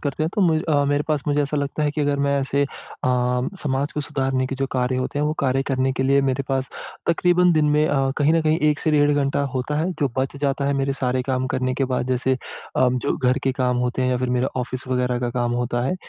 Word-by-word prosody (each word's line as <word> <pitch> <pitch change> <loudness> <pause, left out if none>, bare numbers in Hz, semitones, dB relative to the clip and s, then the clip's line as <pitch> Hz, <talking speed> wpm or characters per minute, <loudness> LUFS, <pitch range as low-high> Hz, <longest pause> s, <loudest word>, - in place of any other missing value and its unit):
करते 145 +1 -2
हैं, 160 - 0
तो 210 - 0
मु 165 -4 +3
अ, 145 -2 +3
मेरे 145 +1 +1
पास 150 -3 0
मुझे 145 0 +2
ऐसा 145 +1 -2
लगता 140 +2 -2
है 150 - +2
कि 150 - -3
अगर 145 -1 +1
मैं 140 0 +1
ऐसे 140 +1 0
अ, - - -7 0.9
समाज 140 0 -1
को 150 - -2
सुधारने 135 -3 -1
के 135 - -4
जो 135 +1 -1
कार्य 125 0 0
होते 130 +3 -2
हैं 150 - +1
वो 150 - 0
कार्य 135 0 +2
करने 130 0 +1
के 130 - -1
लिए 140 +1 +3
मेरे 135 +2 -1
पास 135 0 -1 0.4
तकरीबन 180 +1 +3
दिन 155 -1 +3
में 150 +1 +3
अ, 135 -1 +1
कहीं 145 +2 +3
न 165 - +3
कहीं 155 +1 +2
1 150 - -1
से 155 - +1
डेढ़ 145 -1 +4
घंटा 140 0 +1
होता 130 +3 -2
है 175 +4 0
जो 140 - +2
बच 135 +1 -1
जाता 140 0 -1
है 140 - +2
मेरे 135 0 0
सारे 125 0 +1
काम 130 0 -1
करने 130 0 0
के 135 - 0
बाद। 125 - -1
जैसे 130 +1 +1 0.4
अ, 130 - +4
जो 125 - -1
घर 130 +1 +1
के 135 - +2
काम 125 0 +1
होते 125 +1 -2
हैं 130 - +1
या 125 - +1
फिर 130 0 -1
मेरा 130 +2 +1
ऑफ़िस 130 +1 -5
वगैरह 125 -1 0
का 120 -1 -1
काम 120 0 -1
होता 120 0 -1
है, 180 - 0
135 Hz, 265 wpm, -22 LUFS, 130-145 Hz, 0.9 s, डेढ़